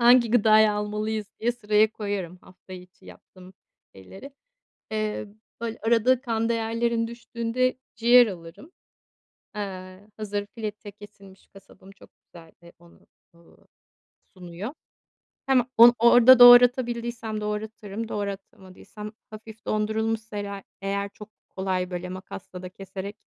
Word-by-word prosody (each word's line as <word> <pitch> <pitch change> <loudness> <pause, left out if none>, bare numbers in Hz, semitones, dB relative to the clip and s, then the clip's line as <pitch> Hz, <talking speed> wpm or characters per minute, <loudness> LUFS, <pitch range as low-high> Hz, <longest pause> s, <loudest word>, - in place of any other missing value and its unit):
hangi 240 -1 +5
gıdayı 215 -2 +5
almalıyız 210 +1 -3
diye 240 +2 +1
sıraya 215 -2 +1
koyarım, 200 -5 -5
hafta 185 0 -17
içi 180 0 -13
yaptığım 185 0 -16 0.4
şeyleri. 190 - -13 0.6
Eee, 215 -1 -3 0.3
böyle, 230 -1 -4
arada 235 +3 +2
kan 230 -3 -2
değerlerim 230 0 -1
düştüğünde, 235 +1 -2 0.2
ciğer 240 +1 +6
alırım. 180 - -10 0.8
Eee, 190 -1 -8
hazır, 205 -1 -4
fileto 210 -2 -7
kesilmiş, 200 -2 -16
kasabım 195 0 -18
çok 195 - -19 0.2
güzel, 165 -2 -16 0.3
onu, 170 0 -21 0.4
ııı, 170 0 -22 0.8
sunuyor. 180 +7 -8 0.7
Hem 260 -2 +3
on 235 +1 +9
orada 245 +2 +7
doğratabildiysem 240 -2 +5
doğratırım, 210 0 -5
doğratamadıysam, 200 0 -8 0.2
hafif 220 0 -12
dondurulmuşsa 220 0 -2
ere 200 -1 -6 0.2
eğer 200 +1 -3
çok 210 +1 -13 0.3
kolay, 185 -1 -2
böyle, 180 0 -5
makasla 185 0 -9
da 180 - -7
keserek, 195 +2 -9
210 Hz, 115 wpm, -25 LUFS, 195-230 Hz, 0.8 s, on